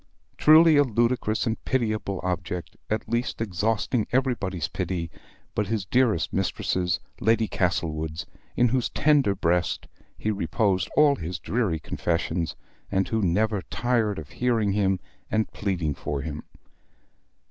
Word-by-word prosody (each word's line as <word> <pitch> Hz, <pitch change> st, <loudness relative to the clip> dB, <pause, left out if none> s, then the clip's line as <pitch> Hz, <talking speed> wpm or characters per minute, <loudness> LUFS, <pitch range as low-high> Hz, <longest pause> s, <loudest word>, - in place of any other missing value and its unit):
Truly 155 Hz, 0 st, +7 dB
a 145 Hz, -, +7 dB
ludicrous 120 Hz, -2 st, +1 dB
and 115 Hz, -1 st, -2 dB
pitiable 110 Hz, -6 st, -1 dB
object, 90 Hz, -1 st, -3 dB
at 110 Hz, 0 st, -1 dB
least 120 Hz, +2 st, -1 dB
exhausting 110 Hz, +3 st, 0 dB
everybody's 115 Hz, -, 0 dB
pity 85 Hz, -3 st, -3 dB, 0.4 s
but 105 Hz, -, -1 dB
his 105 Hz, -2 st, -1 dB
dearest 125 Hz, +3 st, +2 dB
mistress's, 90 Hz, -2 st, 0 dB, 0.2 s
Lady 110 Hz, +1 st, +2 dB
Castlewood's, 80 Hz, -4 st, -1 dB, 0.3 s
in 120 Hz, 0 st, +4 dB
whose 125 Hz, 0 st, +1 dB
tender 145 Hz, -9 st, +3 dB
breast 90 Hz, -1 st, 0 dB, 0.3 s
he 110 Hz, -, -1 dB
reposed 95 Hz, -1 st, 0 dB
all 145 Hz, -2 st, +6 dB
his 85 Hz, +3 st, -4 dB
dreary 100 Hz, -1 st, -1 dB
confessions, 85 Hz, 0 st, -2 dB, 0.4 s
and 95 Hz, 0 st, +1 dB
who 110 Hz, -1 st, 0 dB
never 105 Hz, +3 st, +1 dB
tired 115 Hz, -2 st, 0 dB
of 75 Hz, -3 st, -7 dB
hearing 115 Hz, -5 st, +1 dB
him 95 Hz, -2 st, +1 dB, 0.3 s
and 110 Hz, 0 st, 0 dB
pleading 90 Hz, -7 st, -1 dB
for 70 Hz, 0 st, -4 dB
him. 75 Hz, -1 st, -6 dB
105 Hz, 130 wpm, -26 LUFS, 90-115 Hz, 0.4 s, Truly